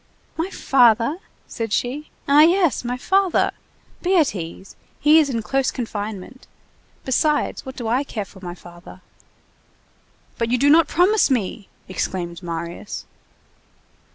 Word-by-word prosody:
"My 330 +4 -2
father!" 245 - +3 0.3
said 225 -2 -5
she. 265 +8 -2 0.2
"Ah 285 +2 +6
yes, 340 - +3
my 245 +1 -3
father! 380 +6 +2 0.5
Be 370 +1 +2
at 310 -5 +3
ease. 180 +1 -8 0.2
He's 300 0 +5
in 230 -4 -2
close 270 +3 0
confinement. 220 0 -6 0.6
Besides, 295 +2 0
what 260 - -7
do 235 - -5
I 245 +5 +1
care 215 -7 -5
for 190 - -16
my 175 -1 -6
father!" 175 +1 -14 1.4
"But 230 -1 0
you 250 - +2
do 285 +3 +4
not 325 +1 +6
promise 380 +4 +3
me!" 215 -5 -2 0.2
exclaimed 180 -2 -4
Marius. 170 +2 -6
250 Hz, 130 wpm, -21 LUFS, 200-300 Hz, 1.4 s, Ah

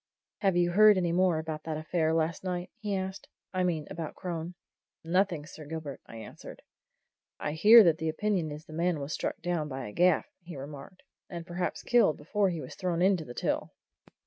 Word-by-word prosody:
"Have 195 -4 +2
you 175 0 +3
heard 210 +2 +7
any 175 -2 +1
more 180 -1 +3
about 155 -1 -4
that 160 -1 -3
affair 160 +1 0
last 160 +1 0
night?" 180 -1 -3
he 210 -3 -2
asked. 190 +1 -4 0.3
"I 185 0 +1
mean 165 -4 0
about 160 -2 -5
Crone?" 175 -1 -5 0.5
"Nothing, 170 -2 +1
Sir 155 0 -11
Gilbert," 155 -3 -6
I - - -11
answered. 110 - -10 0.8
"I 150 - -2
hear 215 +9 +8
that 165 -3 +3
the 160 0 -1
opinion 180 -1 0
is 150 +1 -7
that - - -14
the - - -6
man 170 -2 +1
was 140 +2 -4
struck - - -3
down 175 -4 -1
by 135 -4 -5
a - - -8
gaff," 180 +5 +3 0.2
he 175 -1 -9
remarked. 145 +6 -10 0.3
"And 170 -2 -6
perhaps 175 +1 -3
killed 240 -10 +4
before 195 +6 0
he 170 -3 -3
was - - -8
thrown 180 -2 -1
into 185 -4 +3
the 120 - -9
Till." - - -2
170 Hz, 200 wpm, -29 LUFS, 155-185 Hz, 0.8 s, hear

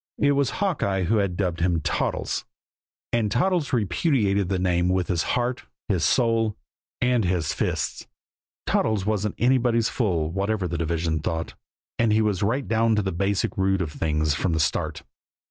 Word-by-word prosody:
It 145 - +3
was 140 -2 +2
Hawkeye 135 - 0
who 105 +6 +2
had 100 -4 0
dubbed 90 -4 -1
him 85 -1 +1
"Toddles." 75 - -1 0.7
And 115 -3 +2
Toddles 165 - +1
repudiated 100 - +1
the 95 - 0
name 90 -1 +1
with 90 -1 0
his 85 -3 +1 0.2
heart, 125 +1 -2 0.2
his 90 -5 +1
soul 115 -3 +2 0.4
and 125 -2 +2
his 90 -4 0
fists. - - -2 0.6
Toddles 110 -4 +1
wasn't 105 -1 -1
anybody's 120 -2 +2
fool, 85 -10 0
whatever 100 +1 -1
the 85 0 -3
division 80 -1 -1
thought, 80 +2 -3 0.5
and 115 -2 +3
he 110 +1 +3
was 105 -4 0
right 120 +7 0
down 115 0 +2
to 105 - +1
the 95 - -1
basic 100 +3 -1
root 95 0 +1
of 85 -4 -2
things 75 -1 0
from 85 +3 -1
the 80 - 0
start. 75 - -1
100 Hz, 165 wpm, -24 LUFS, 90-115 Hz, 0.7 s, It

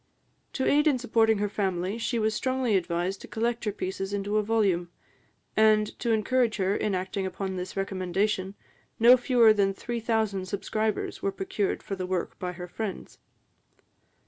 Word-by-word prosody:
To 265 - -1
aid 295 +2 +4
in 285 -4 +4
supporting 225 -2 +2
her 205 +1 0
family, 195 0 -2
she 235 +1 -1
was 220 -1 +1
strongly 255 -2 0
advised 180 +1 -1
to - - -10
collect 230 +1 -2
her 210 - +1
pieces 195 0 -4
into 205 +1 -1
a - - +3
volume; 200 -5 +1 0.7
and, 215 -1 +5
to 240 - -2
encourage 225 +1 +1
her 195 0 +1
in 205 -3 0
acting 190 +1 -2
upon 190 +1 -4
this 185 +1 -6
recommendation, 195 +1 -1 0.4
no 240 +2 +8
fewer 245 -3 +5
than 195 -2 +1
three 240 +3 -4
thousand 220 -4 -1
subscribers 215 +2 -2
were 195 - 0
procured 195 +1 -2
for 195 - -4
the 185 -1 -4
work 185 -2 -3
by 180 -1 -3
her 180 0 -7
friends. 205 +2 -6
205 Hz, 170 wpm, -27 LUFS, 190-225 Hz, 0.7 s, no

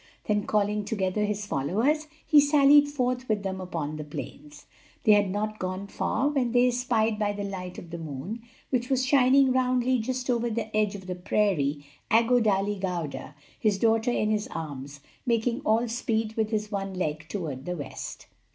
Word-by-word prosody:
Then 210 -1 0
calling 210 0 +1
together 205 0 -1
his 210 0 -2
followers, 225 - 0 0.2
he 300 - +6
sallied 290 0 +6
forth 255 -3 -2
with 210 -2 0
them 190 -1 -3
upon 155 -4 -4
the 150 - -5
plains. 295 - -9 0.4
They 215 - +5
had 205 -2 +5
not 215 +2 -2
gone 185 +1 -3
far 265 +6 -1
when 260 -5 0
they 245 0 +5
espied 235 -3 +1
by 205 -1 +1
the 205 0 -4
light 185 -2 -6
of 170 - -10
the 170 - -5
moon, 160 - -6 0.3
which 245 -2 0
was 260 -1 +2
shining 265 0 +5
roundly 255 0 +2
just 255 +3 -3
over 240 -1 +1
the 220 -1 -3
edge 210 -1 +1
of 190 -2 -9
the 185 - -3
prairie, 175 -6 0 0.2
Aggo 235 +2 +4
Dali 205 -1 +1
Gauda, 170 -6 -4 0.2
his 210 -3 +2
daughter 225 +2 +2
in 215 -3 +1
his 210 -1 0
arms, 145 -3 -7 0.3
making 235 +2 +1
all 235 -3 +2
speed 225 -2 -1
with 220 -1 0
his 210 -1 -2
one 195 -1 -3
leg 155 -3 -3
toward 150 -10 -4
the 180 0 -3
west. 145 - -7
215 Hz, 180 wpm, -27 LUFS, 185-245 Hz, 0.4 s, he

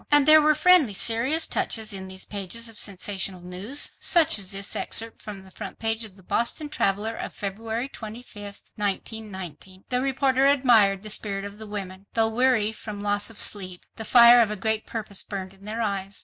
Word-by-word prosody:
And 290 -1 +5
there 310 0 +8
were 305 0 +3
friendly 310 - +4
serious 245 - +1
touches 220 -1 0
in 190 -1 -6
these 190 0 -6
pages 205 +3 -5
of 220 - -6
sensational 190 -1 -2
news—such 210 - +2
as 190 -2 -2
this 195 0 -2
excerpt 225 0 -1
from 200 -3 -9
the 190 - -17
front - - -8
page 225 0 -1
of 200 -4 -10
the 190 - -18
Boston 235 - -1
Traveler 210 -4 -1
of - - -6
February 220 +5 -4
25, 215 -4 -10 0.2
1919. 190 -3 -5
"The 250 -1 0
reporter 270 0 +2
admired 230 -8 +4
the 215 - -2
spirit 200 -2 -2
of 200 +1 -9
the 220 - -8
women. 195 -2 -7
Though 225 -1 +2
weary 230 -2 +2
from 210 -2 -8
loss 205 +1 +1
of 225 - -11
sleep, 185 -4 -1
the 225 - -6
fire 240 +1 +7
of 225 - +2
a 210 - -3
great 220 +2 -2
purpose 215 -3 -4
burned 190 -2 -7
in 195 +1 -18
their 225 +2 -3
eyes 200 -1 -3
215 Hz, 190 wpm, -25 LUFS, 195-235 Hz, 0.2 s, there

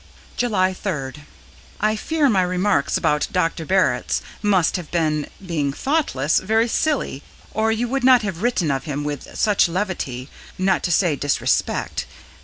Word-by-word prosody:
July 190 -6 +1
3d. 150 -9 -4 0.6
I 215 +1 +2
fear 305 +6 +1
my 200 -7 +3
remarks 180 -3 +1
about 150 0 +1
Dr. 165 -3 -1
Barritz 185 -10 +2 0.2
must 195 -5 +2
have 175 -4 -5
been, 155 -3 0 0.2
being 150 -6 -1
thoughtless, 165 - +1
very 220 +4 +2
silly, 265 - -1 0.3
or 220 +1 +1
you 230 +2 0
would 270 +1 -2
not 250 -3 +6
have 190 -4 -4
written 220 -10 +1
of 135 +3 -2
him 145 -2 -3
with 145 -1 -5
such 205 -4 +3
levity, 165 -9 -3 0.3
not 185 -1 +2
to 175 - -1
say 170 -2 +3
disrespect. 145 0 -1
185 Hz, 150 wpm, -21 LUFS, 150-220 Hz, 0.6 s, not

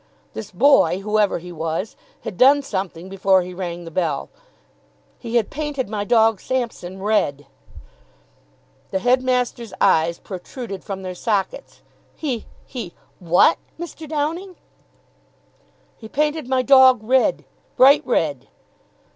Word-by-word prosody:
"This 215 -2 -7
boy, 215 -3 +4
whoever 210 0 +1
he 175 +1 -9
was, 165 +5 -4 0.3
had - - -6
done 280 +6 +5
something 190 -7 -4
before 190 -1 +2
he 180 +1 -8
rang 175 -1 -5
the 165 - -9
bell 160 -5 -2 0.9
he 235 -1 -5
had 230 -3 +1
painted 295 -5 -3
my 210 -1 -2
dog 225 -1 +3
Sampson 220 -7 -4
red." 145 -9 0 1.4
The - - -1
headmaster's 250 0 0
eyes 165 +1 +3
protruded 195 +2 -8
from 195 -2 -6
their 185 -1 -5
sockets. 195 0 -3 0.3
"He 260 -8 -4 0.2
he 230 -9 -7 0.2
what, 180 - +4 0.2
Mr. 325 -3 -8
Downing?" 325 +5 -3 1.4
"He 220 - -11
painted 300 0 -1
my 260 -1 +2
dog 260 -2 +6
red 255 +3 +2 0.3
bright 275 +3 +6
red." 150 - -1
215 Hz, 120 wpm, -21 LUFS, 185-260 Hz, 1.4 s, dog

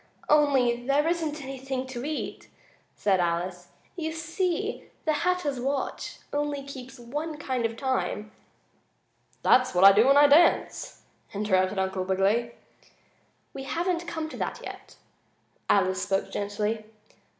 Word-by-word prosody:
"Only 265 -5 +3
there 290 +3 +3
isn't 315 -3 -1
anything 265 -1 -4
to 255 -2 -6
eat," 300 +1 -4 0.5
said 195 -3 +2
Alice. 175 +1 -1 0.3
"You 320 -3 -3
see, 355 +5 -2 0.2
the 310 - +2
Hatter's 300 -4 0
watch 270 +2 -3 0.2
only 290 -1 -1
keeps 265 -1 -9
one 295 +6 -5
kind 260 -5 -1
of 225 0 -10
time 260 -5 -2 0.5
" - - -40
"That's 255 -6 +4
what 180 - +4
I 195 - +11
do 215 +5 +5
when 275 +1 +6
I 290 - +8
dance," 305 +4 +3 0.3
interrupted 190 -1 +1
Uncle 190 0 -1
Wiggily. 200 +6 +1 1.0
"We 270 -1 -7
haven't 345 +3 -1
come 320 -2 -3
to - - -8
that - - -3
yet," - - -9 0.7
Alice 190 -1 +3
spoke 195 0 -1
gently. 210 +2 -2
265 Hz, 135 wpm, -27 LUFS, 205-300 Hz, 1.0 s, I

